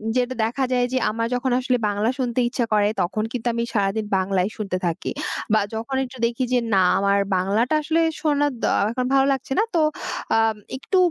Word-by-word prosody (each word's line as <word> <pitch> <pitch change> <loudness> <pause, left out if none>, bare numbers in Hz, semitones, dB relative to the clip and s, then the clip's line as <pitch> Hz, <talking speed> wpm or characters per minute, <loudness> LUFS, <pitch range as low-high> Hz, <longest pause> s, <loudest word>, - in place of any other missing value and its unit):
যেটা 250 0 +1
দেখা 245 +4 -1
যায় 245 -1 +2
যে - - +2
আমার 230 +1 -1
যখন 250 +1 -1
আসলে 250 0 +1
বাংলা 205 +2 0
শুনতে 250 -1 -1
ইচ্ছা 245 -2 -1
করে, 205 -1 +4
তখন 205 +5 -1
কিন্তু 245 -1 -3
আমি 235 0 -1
সারাদিন 205 +1 0
বাংলায় 190 +1 0
শুনতে 195 -4 -2
থাকি। 165 -1 -2 0.4
বা 215 - +5 0.2
যখন 230 +5 -3
একটু 255 0 -9
দেখি 235 +2 -1
যে 250 - +4
না 190 - +5 0.2
আমার 200 0 +2 0.2
বাংলাটা 210 +10 +1
আসলে 325 +2 +1 0.2
শোনা 290 -1 +2
দ - - -12 0.3
এখন 250 +1 -2
ভালো 270 0 +5
লাগছে 270 0 -6
না, - - +4
তো 325 - +4 0.6
আম 225 -1 +2 0.2
একটু 375 +8 -1
235 Hz, 195 wpm, -23 LUFS, 205-260 Hz, 0.6 s, বা